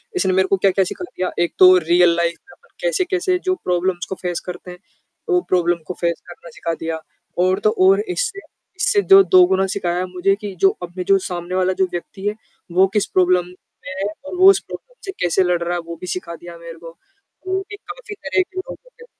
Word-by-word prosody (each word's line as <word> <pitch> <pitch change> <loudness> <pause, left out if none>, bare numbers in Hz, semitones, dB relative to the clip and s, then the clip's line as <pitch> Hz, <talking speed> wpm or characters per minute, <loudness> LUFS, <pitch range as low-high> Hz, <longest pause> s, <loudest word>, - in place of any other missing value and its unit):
इसने 190 - +1
मेरे 190 0 +3
को 195 - +2
क्या-क्या 195 0 +2
सिखा 270 - -6
दिया, 185 - -4
एक 175 0 0
तो 185 0 +8
रियल 175 0 +4
लाइफ़ 170 0 0
में - - -19
अपन 470 - -29
कैसे-कैसे 375 -6 0
जो 370 0 +2
प्रॉब्लम्स 180 0 0
को 190 - -3
फेस 175 -2 -2
करते 180 0 -8
हैं, 180 - -11 0.5
वो 360 -1 +3
प्रॉब्लम 175 -1 +2
को - - -3
फेस 170 -1 -1
करना 175 -1 -12
सिखा 165 +1 -4
दिया। 160 0 -3 0.4
और 185 +2 +2
तो 215 - +5 0.2
और 195 +1 +5
इससे, 395 - -2 0.4
इससे 410 +2 +2
जो 390 0 +10
दोगुना 190 - +4
सिखाया 180 -2 -1
मुझे 185 +2 0
कि 205 -2 -5
जो 195 - +7
अपने 175 +1 -5
जो 195 +2 +4
सामने 175 -1 -5
वाला 185 0 +1
जो - - +5
व्यक्ति 190 +3 -7
है, 210 - -1 0.4
वो 185 +2 +4
किस 210 - +2
प्रॉब्लम 180 -1 +2
में 185 +1 -13
है - - 0 0.2
और 285 - -6
वो 375 +1 +8
उस 395 - +5
प्रॉब्लम - - -10
से 390 - -4
कैसे 175 +2 +2
लड़ 180 -1 0
रहा 175 +1 -2
है 175 - -1
वो 170 0 -7
भी 180 - -6
सिखा 170 -2 -7
दिया 170 0 -11
मेरे 170 0 -10
को। 165 0 -10 0.5
क्योंकि 380 +1 -3
काफ़ी 410 0 -10
तरह 380 - 0
के 375 - -15
लोग 370 - -7
होते - - -17
185 Hz, 220 wpm, -20 LUFS, -, 0.5 s, जो